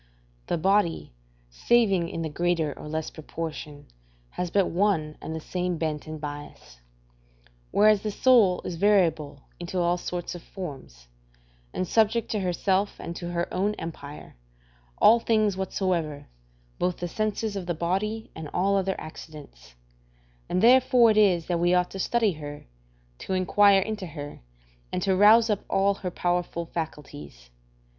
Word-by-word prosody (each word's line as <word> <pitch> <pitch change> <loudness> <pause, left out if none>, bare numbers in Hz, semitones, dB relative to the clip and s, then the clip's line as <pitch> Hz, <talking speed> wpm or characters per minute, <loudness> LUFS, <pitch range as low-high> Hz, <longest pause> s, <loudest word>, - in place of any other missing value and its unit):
The - - 0
body, 180 - +1 0.4
saving 195 - +2
in 165 - -4
the 160 - -3
greater 165 -2 0
or - - -10
less 155 +1 -3
proportion, 155 -2 -7 0.5
has 180 - -3
but 195 +1 +2
one 170 -5 0
and 160 - -5
the - - -4
same 180 +2 -3
bent 155 -1 -3
and 155 0 -6
bias; 145 - -9 0.9
whereas 210 -1 +4
the 215 - -2
soul 210 -4 +4
is 175 - -4
variable 165 -8 +2 0.2
into 175 +2 -5
all 175 0 +2
sorts 175 0 -4
of 175 - -8
forms; 135 - -9 0.6
and 185 - -3
subject 220 +3 +2
to 215 - 0
herself 190 +2 0
and 170 - -6
to 175 - -5
her 175 0 -1
own 205 +3 0
empire, 150 -4 -9 0.6
all 230 +2 +6
things 215 -3 +1
whatsoever, 180 -6 -2 0.5
both 180 -1 0
the 175 - -4
senses 215 +2 -2
of 190 -3 -5
the 175 - -1
body 195 +7 -2
and 160 -2 -8
all 200 +2 +2
other 190 0 0
accidents: 145 - -11 0.7
and 185 - 0
therefore 245 -1 +6
it 215 - 0
is 185 -6 +4
that 175 -2 -1
we 175 +1 +3
ought 180 0 +1
to 195 - -7
study 225 +1 +1
her, 145 -3 -8 0.5
to - - -4
inquire 195 +1 +4
into 210 -2 -4
her, 145 -2 -8 0.5
and 180 - -2
to 190 -1 +2
rouse 215 +4 +6
up 210 -3 0
all 195 +1 +2
her 190 -2 -5
powerful 175 -1 -2
faculties. 75 - -7
180 Hz, 155 wpm, -26 LUFS, 160-200 Hz, 0.9 s, all